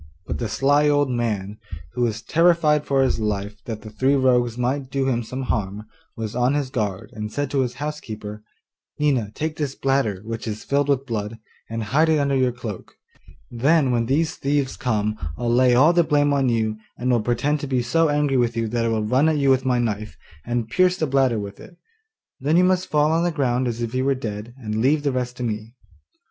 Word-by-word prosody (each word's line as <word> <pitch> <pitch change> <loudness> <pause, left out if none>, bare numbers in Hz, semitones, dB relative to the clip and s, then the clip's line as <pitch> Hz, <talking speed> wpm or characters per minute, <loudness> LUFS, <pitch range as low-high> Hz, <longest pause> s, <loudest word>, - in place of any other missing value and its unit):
But - - -4
the 115 - -2
sly 145 +6 +3
old 145 -2 +2
man, 105 -4 -2 0.3
who 125 - -3
was 115 -2 -1
terrified 165 -3 +3
for 135 -1 +3
his 130 - +1
life 105 -1 -3
that 110 -2 -6
the 110 - -9
three 130 +6 +2
rogues 125 -3 +2
might 130 +2 -1
do 135 0 -1
him 120 -3 +1
some 130 +3 -5
harm, 105 -3 -2 0.3
was 110 -1 -4
on 125 +3 +2
his 140 -3 -2
guard, 105 -6 -3
and 105 -1 -5
said 145 +1 -2
to 140 - +1
his 125 -2 -2
housekeeper, 110 -8 -6 0.6
'Nina, 135 -8 +1
take 155 0 -3
this 145 -3 -2
bladder, 135 -8 0
which 115 0 -5
is 110 0 -4
filled 140 0 0
with 135 -1 +1
blood, 110 -2 -4 0.3
and 115 0 -3
hide 150 +9 +2
it 160 - +4
under 140 -1 +1
your 130 -1 +2
cloak; 115 -6 -8 0.6
then 135 +3 +3
when 115 -1 +1
these 155 +5 0
thieves 140 -1 0
come 110 -3 -1 0.2
I'll 120 -1 0
lay 125 0 +4
all 150 +7 +6
the 175 0 +4
blame 145 -2 +2
on 135 -2 +2
you, 110 -2 0 0.2
and 125 +1 0
will 120 -2 +3
pretend 130 +6 0
to 145 - -5
be 130 -2 0
so 165 +6 +2
angry 145 -2 +1
with 120 -1 +1
you 115 -1 0
that 120 +1 -1
I - - +1
will 110 -1 0
run 130 +8 +3
at 155 - +1
you 140 -2 +3
with 130 0 +2
my 125 -1 +2
knife, 110 -3 -2 0.3
and 120 0 -2
pierce 180 +8 +2
the 160 - 0
bladder 135 -4 +2
with 100 -1 -6
it; 175 - -14 0.6
then 150 +5 +2
you 180 - +5
must 185 0 +1
fall 150 0 +3
on 165 +1 +2
the 175 - +2
ground 130 -5 0
as 120 0 -3
if 115 0 -4
you 130 +1 0
were 140 0 +2
dead, 115 -1 -6
and 110 -3 -3
leave 145 +4 +2
the 140 - +1
rest 125 -1 -3
to 125 - -4
me. 110 +1 -4
125 Hz, 225 wpm, -23 LUFS, 115-145 Hz, 0.6 s, all